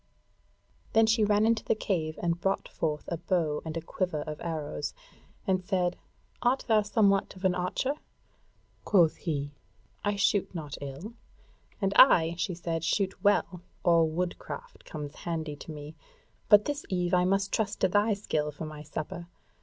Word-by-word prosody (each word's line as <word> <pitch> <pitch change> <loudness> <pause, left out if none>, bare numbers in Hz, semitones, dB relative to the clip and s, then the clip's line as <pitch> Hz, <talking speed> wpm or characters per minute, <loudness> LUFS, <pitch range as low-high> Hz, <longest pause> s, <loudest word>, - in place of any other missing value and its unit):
Then 225 0 +6
she 220 0 +3
ran 210 +1 +3
into 225 -1 +2
the - - +1
cave 160 -7 -2
and 170 0 0
brought 195 +1 0
forth 150 -2 -2
a 170 - -2
bow 165 -3 0
and 160 0 -4
a - - -3
quiver 165 -2 -2
of 150 -1 -7
arrows, 160 -3 -4 0.5
and 185 -2 +1
said: 180 -1 0 0.5
"Art 255 +2 +2
thou 220 -2 +5
somewhat 205 -2 +2
of 185 +1 -6
an 185 - +4
archer?" 180 +10 -1 0.9
Quoth 175 -6 +4
he: 145 -4 -3 0.5
"I 205 0 +1
shoot 200 -1 +1
not 150 -4 -5
ill." 140 - -7 0.7
"And 195 -2 0
I," 165 -10 +7
she 180 0 -1
said, 165 -1 -3
"shoot 190 +4 0
well, 200 -3 +2 0.2
all 170 -2 +5
woodcraft 180 - -5
comes 150 -2 -6
handy 160 -3 -3
to 160 - -9
me. 150 0 -8 0.6
But 210 -1 +7
this 290 0 -2
eve 180 -2 0
I 180 0 +5
must 195 +1 +1
trust 205 -2 0
to - - +5
thy 205 +3 +2
skill 155 -7 -1
for 150 +2 -7
my 155 -1 -8
supper. 155 +3 -6
180 Hz, 165 wpm, -29 LUFS, 160-205 Hz, 0.9 s, I